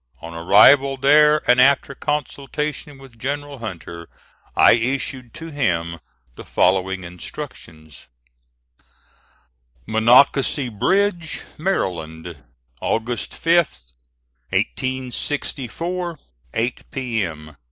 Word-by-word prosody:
On 85 0 -9
arrival 130 +11 +5
there, 150 +3 +4
and 125 +1 +5
after 140 +1 +3
consultation 145 0 -4
with 135 -4 -16
General 145 +2 -4
Hunter, 85 -6 -8 0.5
I - - +7
issued 125 +1 -1
to 165 0 -8
him 85 - -1 0.4
the - - -10
following 95 0 +1
instructions: 80 -3 -10 1.8
"MONOCACY 125 +4 +4
BRIDGE, 170 - 0 0.2
MARYLAND, 85 - -3 0.5
August 120 +2 -2
5, 170 +1 +3 0.9
1864 130 - -3 0.4
8 120 +2 -1
P.M. 95 - -4
125 Hz, 80 wpm, -21 LUFS, 95-145 Hz, 1.8 s, I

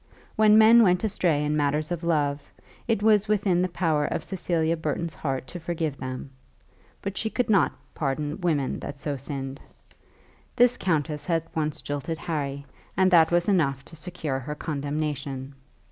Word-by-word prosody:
When 215 0 +6
men 225 +2 +8
went 180 -3 +3
astray 175 -8 +1
in 150 +1 0
matters 150 +2 0
of 175 -1 -3
love 145 -4 +1 0.5
it 225 -3 +1
was 215 -1 +4
within 200 -4 +2
the 185 - 0
power 160 -4 +1
of - - -2
Cecilia 170 -4 0
Burton's 160 +1 -3
heart 135 -4 -3
to 175 - -6
forgive 160 -3 -3
them; 130 +1 -6 0.7
but 200 0 -4
she 220 - -1
could 245 0 0
not 195 -4 +4 0.2
pardon 150 +3 -2
women 150 -7 0
that 145 - -7
so 145 0 -3
sinned. 135 0 -6 0.9
This 245 0 +5
countess 150 - -1
had 165 -2 +1
once 155 -1 -2
jilted 145 +3 -3
Harry, 140 -4 -3 0.3
and 190 0 +4
that 165 -2 +6
was 175 0 +2
enough 140 -9 +1
to 165 - -13
secure 155 -4 -4
her 150 +3 -5
condemnation. 145 -2 -3
160 Hz, 160 wpm, -26 LUFS, 145-180 Hz, 0.9 s, men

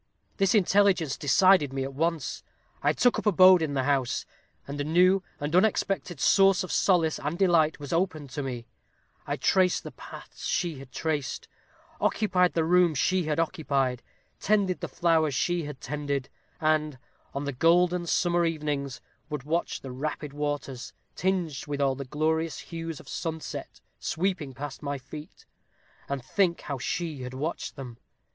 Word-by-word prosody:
This 195 +1 +3
intelligence 195 -7 +3
decided 165 0 +4
me 135 0 -2
at 135 +1 -5
once 165 0 -1 0.4
I - - +3
took 245 - +2
up - - -7
my - - +8
abode 185 -1 +7
in 150 -3 -1
the 130 - +1
house; 135 -3 0 0.4
and 145 +1 -4
a - - 0
new 180 +5 +4 0.2
and 145 +3 -2
unexpected 190 -4 +1
source 195 +3 +5
of 185 - -6
solace 165 -5 +2
and 150 +4 -3
delight 170 -5 +3
was 145 +1 -5
opened 165 -6 -1
to 145 - -3
me, 125 -4 -5 0.6
I - - -1
traced 185 -1 +2
the - - -7
paths - - -9
she 165 -6 -1
had 135 -1 -12
traced; 145 -1 -3 0.5
occupied 185 -4 +2
the 165 - +1
room 175 -1 +4
she 185 +5 +1
had 155 0 -1
occupied; 140 -7 0 0.4
tended 200 -3 +1
the - - -4
flowers 160 -5 +2
she 175 +1 0
had 145 -3 -7
tended; 140 -1 -3 0.3
and, 155 -3 +1 0.4
on 140 - -2
the 140 -1 -3
golden 175 +5 +3
summer 175 0 +2
evenings, 150 -5 -2 0.3
would 150 -4 -4
watch 165 +4 -2
the 135 - -7
rapid 150 +2 -4
waters, 145 -3 -4 0.2
tinged 175 -8 -1
with 145 -1 -3
all 135 -1 +2
the 135 +1 -6
glorious 155 +3 -1
hues 165 -2 -6
of - - -15
sunset, 160 -1 -5 0.2
sweeping 160 -6 -2
past 145 +1 -6
my 145 -1 -3
feet, 150 +3 -11 0.6
and 140 -2 -3
think 180 -1 +1
how 140 -3 -5
she 155 +1 -3
had 125 0 -6
watched 155 +6 -4
them. 125 -5 -9
155 Hz, 165 wpm, -27 LUFS, 140-175 Hz, 0.6 s, my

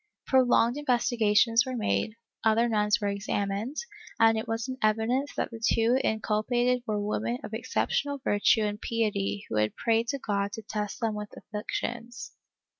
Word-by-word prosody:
Prolonged 250 -1 +3
investigations 235 -4 +3
were 255 0 -4
made, 100 - -1 0.3
other 225 +2 +3
nuns 210 0 +2
were 205 - -1
examined, 200 +5 -2 0.4
and 225 0 +6
it 220 - -3
was 225 +1 -2
in 260 0 -5
evidence 225 +6 +1
that - - -2
the 225 -1 -9
two 230 +3 +3
inculpated 240 +3 +1
were 210 -1 0
women 120 - -1
of 215 - -8
exceptional 280 +5 -1
virtue 205 0 +3
and 210 0 -2
piety 205 -3 -1
w^ho 105 - +2
had 105 - -1
prayed 230 0 +1
to 280 - -1
God 200 -5 -2
to 225 - -6
test 210 0 -4
them 225 -2 0
with 210 0 -5
afflictions. 235 +3 -5
225 Hz, 160 wpm, -28 LUFS, 210-240 Hz, 0.4 s, and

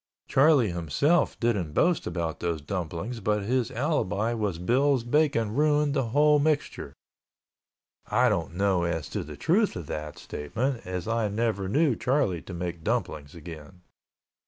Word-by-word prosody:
Charlie 135 - +4
himself 85 - +1
didn't 100 -10 0
boast 175 - +2
about 85 -2 -3
those 85 -2 -2
dumplings 90 +8 -4
but 105 -2 0
his 120 +2 0
alibi 120 - -1
was 105 -7 -2
Bill's 130 +7 +2
bacon 120 -4 +1
ruined 150 +1 +2
the 135 -3 0
whole 150 +5 +4
mixture. 150 0 -1 1.1
I - - +3
don't 85 - -1
know 95 -1 +2
as 80 -4 -2
to - - -3
the - - -10
truth 200 +6 +2
of 90 - -6
that 75 +1 -6
statement 115 - -3
as 90 0 -4
I 115 -1 0
never 105 -2 -1
knew 145 +2 +2
Charlie 125 - 0
to 95 - -10
make 85 -1 -5
dumplings 85 - -2
again. 85 +1 -11
110 Hz, 150 wpm, -27 LUFS, 85-135 Hz, 1.1 s, Charlie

